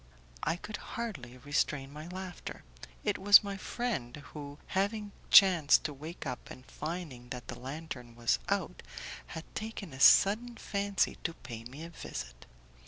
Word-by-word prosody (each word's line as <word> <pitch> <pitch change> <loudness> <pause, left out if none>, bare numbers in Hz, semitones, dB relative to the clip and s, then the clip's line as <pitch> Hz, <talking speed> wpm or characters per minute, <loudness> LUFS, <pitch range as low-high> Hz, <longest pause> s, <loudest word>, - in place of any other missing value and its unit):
I 165 - +1
could 205 +4 -6
hardly 165 - -6
restrain 140 +1 -1
my 155 +2 -7
laughter. 185 0 -7 0.4
It - - 0
was 205 +2 +9
my 200 -1 -3
friend, 190 - -3 0.2
who, 145 -1 -7
having 205 +2 0 0.2
chanced 175 -7 +8
to 150 - -2
wake 155 +5 -8
up 125 -2 -5
and 130 - -10
finding 150 -7 -6
that 125 -1 -7
the - - -5
lantern 130 -3 -7
was 115 - +2
out, - - -1 0.5
had 160 - -6
taken 215 -7 -5
a 130 - -9
sudden 220 - +6
fancy 200 -2 0
to 165 - -2
pay 115 -2 -8
me 135 +6 -8
a 170 - -8
visit. - - -7
160 Hz, 155 wpm, -32 LUFS, 130-195 Hz, 0.5 s, was